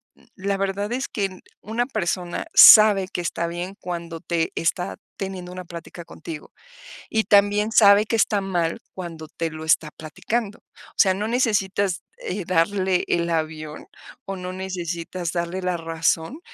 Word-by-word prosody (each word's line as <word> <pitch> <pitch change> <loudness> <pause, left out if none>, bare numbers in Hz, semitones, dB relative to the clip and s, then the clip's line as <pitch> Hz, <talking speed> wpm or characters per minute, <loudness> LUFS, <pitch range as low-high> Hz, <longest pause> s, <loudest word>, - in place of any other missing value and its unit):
n - - -25
la 195 +1 -2
verdad 195 +2 -2
es 260 +2 -2
que 205 - -2
n 185 -1 -7 0.2
una 235 +4 -2
persona 180 -6 -2
sabe 210 -3 +9
que 180 - -4
está 170 0 -2
bien 175 +3 -5
cuando 170 -2 -6
te 170 -2 -1
está 175 +2 -1 0.2
teniendo 190 -2 -6
una 180 0 -8
plática 170 0 -9
contigo, 155 -2 -9 0.6
y 220 0 +1
también 205 +1 +3
sabe 205 -1 +6
que 230 - -1
está 210 -1 +2
mal 175 -4 -1
cuando 165 -4 -7
te 165 +1 -4
lo 155 0 -8
está 160 0 +2
platicando, 205 +8 -4
o - - -21
sea, 190 - +5
no 210 +3 -2
necesitas, 200 -6 0 0.2
eh, 310 - -4
darle 185 +1 +1
el 170 0 0
avión, 155 -1 -4 0.4
o, 195 - -4
no 180 0 -6
necesitas 175 -2 -4
darle 170 +2 -2
la 180 -1 -1
razón. 165 - -1
185 Hz, 160 wpm, -23 LUFS, 170-200 Hz, 0.6 s, sabe